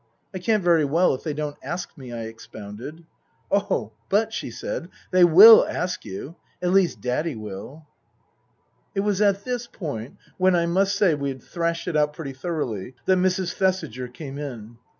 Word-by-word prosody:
" - - -45
I 185 - -4
can't 210 +2 +1
very 170 -3 +4
well 165 +6 +3
if 130 - -5
they 155 -3 -3
don't 150 -1 -4
ask 175 +1 -5
me," 130 -6 -10
I 115 -1 -5
expounded. 110 +6 -9 0.2
" - - -40
Oh, 200 - 0 0.2
but," 220 +3 +2
she - - -4
said, - - -5
" - - -28
they 185 -1 +5
will 195 +7 +10
ask 180 +1 -3
you. 135 - -7 0.2
At 180 0 0
least 190 -2 +2
Daddy 135 +5 -1
will." 110 +8 -8 1.1
It 195 - +1
was 205 -1 0
at 200 -1 +3
this 245 -1 -3
point 140 - -6 0.2
(when, 185 0 +4
I 170 -1 +2
must 195 +4 +1
say, 200 -5 +3
we 140 -1 -2
had 130 -2 -7
thrashed 170 0 -2
it 175 - -2
out 150 0 +2
pretty 145 -3 -6
thoroughly) 130 - -4
that 185 -1 +3
Mrs. 185 0 0
Thesiger 185 - -1
came 140 +1 -8
in. 120 -5 -8
165 Hz, 190 wpm, -24 LUFS, 130-185 Hz, 1.1 s, will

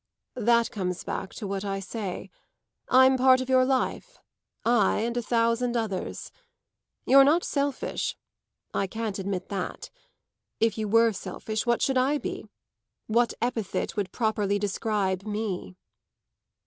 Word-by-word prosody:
"That 235 0 +3
comes 180 -3 -3
back 190 - -4
to 220 - -6
what 195 0 -3
I 195 -1 -2
say. 195 0 -5 0.6
I'm 260 +1 +6
part 260 0 +6
of 260 0 -4
your 260 0 +5
life 265 - -1 0.5
I 225 -4 +3
and 235 +1 -2
a 245 - 0
thousand 235 +1 +1
others. 210 -5 -4 0.7
You're 275 +1 +8
not 315 +5 +4
selfish 280 -2 -2 0.6
I 195 - 0
can't 220 -1 -4
admit 190 -1 -3
that. 195 -3 -5 0.7
If 225 0 +2
you 215 -1 -2
were 230 +2 +4
selfish, 215 +3 -4
what 235 -1 +2
should 265 -1 +2
I 275 +4 +2
be? - - -5 0.6
What 235 +2 +1
epithet 230 -5 -2
would 200 -3 -2
properly 210 -3 0
describe 200 -2 -1
me?" 205 - -4
225 Hz, 135 wpm, -27 LUFS, 200-250 Hz, 0.7 s, You're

